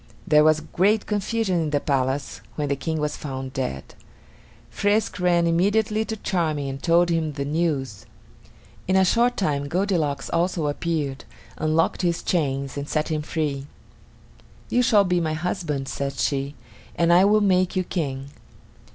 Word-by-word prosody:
There 150 0 +5
was 155 0 +4
great 200 +7 +1
confusion 205 -3 0
in 155 - -1
the 145 -1 +1
palace 135 0 -1
when 145 -2 -2
the 140 - +1
King 155 +4 -3
was 150 0 -1
found 130 -2 -6
dead. 100 - -4 0.8
Frisk 205 0 0
ran 175 -1 +3
immediately 210 +6 +2
to 220 - -4
Charming 160 -8 -1
and 135 0 -6
told 170 +1 +3
him 160 -2 0
the 140 -1 -3
news. 145 - -2 0.8
In 185 - +2
a 190 0 +5
short 240 +5 +2
time 145 -7 0
Goldilocks 165 -5 0
also 170 -1 0
appeared, 145 -2 -2 0.3
unlocked 155 +3 +1
his 170 -2 0
chains, 140 -5 -1
and 140 +1 -5
set 155 +1 -1
him 155 -1 -1
free. 145 -3 -3 1.0
"You 245 - +3
shall 225 -5 +5
be 180 -2 +1
my 160 -1 -1
husband," 155 -4 -3
said 140 0 -3
she, 140 +1 -1 0.4
"and 170 0 +3
I 180 +2 +6
will 210 +2 +5
make 185 -2 +2
you 185 - +1
King." 140 -7 -3
160 Hz, 160 wpm, -24 LUFS, 140-185 Hz, 1.0 s, I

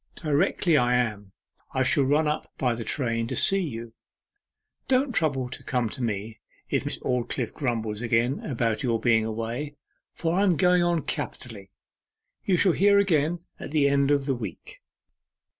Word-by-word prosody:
Directly 160 +1 +1
I 125 -1 +3
am 105 -5 -2 0.4
I 130 - +2
shall 135 +1 +3
run 150 +3 +2
up 150 - -3
by 125 -3 +1
the 115 0 -5
train 115 -2 -1
to - - -4
see 195 0 +5
you. 115 -8 -6 0.9
Don't 260 0 +2
trouble 140 - +1
to - - -6
come 125 -3 -1
to 130 - -8
me 110 -1 -3 0.3
if - - 0
Miss - - -2
Aldclyffe 125 -1 -2
grumbles 115 -5 -2
again 120 +3 +1
about 115 -5 -2
your 115 -4 0
being 110 -1 +2
away, 115 +6 -4 0.4
for 165 -1 -2
I - - +3
am 185 -5 +3
going 180 +1 +4
on 175 -2 +1
capitally.... 105 -6 -6 0.7
You 185 -3 +2
shall 185 +1 +4
hear 200 +4 +4
again 170 -4 +2 0.2
at - - -7
the 145 -1 +2
end 140 0 +2
of 140 -2 +2
the 135 - +1
week. 105 -8 -8
130 Hz, 170 wpm, -26 LUFS, 115-160 Hz, 0.9 s, see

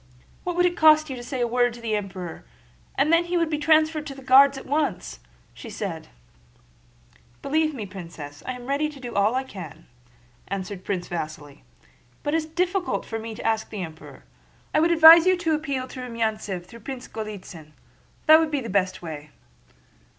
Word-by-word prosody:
"What 355 -1 -2
would 355 0 +3
it 350 0 +1
cost 310 -2 +5
you - - -4
to 245 - -8
say 250 +1 -4
a 240 - +2
word 245 0 +1
to - - -11
the 225 -2 -2
Emperor, 190 - -6 0.5
and 295 +4 +3
then 335 +1 +4
he 350 +1 -1
would 335 -2 0
be 300 - -1
transferred 310 0 +2
to 275 - -7
the 270 - -12
Guards 270 +2 +6
at - - -9
once?" 280 - -2 0.4
said - - -6
she. - - -32
"Believe 310 +1 +1
me, 220 -5 -5
Princess, 165 -6 -9
I 255 - -2
am 250 -1 -10
ready 285 +3 0
to 295 -2 -12
do 245 -2 -7
all 205 +4 +2
I 260 - 0
can," 185 - -10 0.6
answered 190 -1 -5
Prince 185 -3 -3
Vasíli, 155 -4 -6 0.6
"but 290 - -1
it - - +4
is 320 - -2
difficult 360 +3 -1
for 225 - -4
me 225 0 -7
to - - -9
ask 220 -1 0
the 205 -4 -5
Emperor. 160 -2 -11 0.5
I - - +4
should 335 - +3
advise 330 +1 +9
you 370 0 +4
to 330 -2 0
appeal 280 -4 -2
to 255 - -9
Rumyántsev 220 -6 -3
through 230 +6 -13
Prince 255 +2 -7
Golítsyn. 190 -8 -8 0.5
That 315 +1 +8
would 325 -1 +1
be 290 -2 -1
the 230 -4 -6
best 185 -2 0
way." 150 -2 -7
245 Hz, 195 wpm, -24 LUFS, 185-305 Hz, 0.6 s, advise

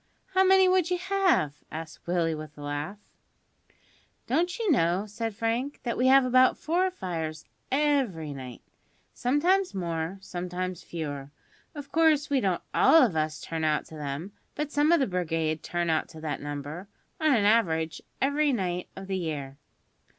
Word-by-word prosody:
How 380 0 +5
many 380 0 +6
would 365 -2 +3
you 360 - +1
have?" 360 - +1
asked 160 +1 -8
Willie 170 -2 +1
with 155 -1 -8
a 145 - -9
laugh. 145 +7 -4 1.3
"Don't 350 +2 0
you 445 -6 +1
know," 185 - +2
said 225 +1 -4
Frank, 235 +5 -2
"that 235 - -1
we 250 - +2
have 270 0 +6
about 255 +1 +4
four 355 +4 +1
fires 165 - -5 0.3
every 260 - +1
night? 130 -3 -9 0.5
Sometimes 350 - +1
more, 170 0 -3
sometimes 180 -1 -4
fewer. 145 -4 -5 0.5
Of 285 -1 -8
course, 310 -2 +3
we 275 -2 +3
don't 185 -3 0
all 325 -2 +6
of 215 -10 +1
us 155 0 -1
turn 160 -1 -4
out 155 -1 +1
to 160 - -10
them; 150 +5 -5 0.2
but 295 -1 -3
some 295 +2 +3
of 340 - +5
the 270 - +3
brigade 165 -5 -1
turn 175 0 -1
out 160 - 0
to 160 - -11
that 155 -2 -3
number, 145 +5 -6 0.3
on 310 -4 +4
an 210 -3 +2
average, 165 -8 +2 0.2
every 285 +2 +2
night 180 -6 -2
of 195 - -8
the 190 -1 -2
year." 145 -5 -5
190 Hz, 165 wpm, -27 LUFS, -, 1.3 s, many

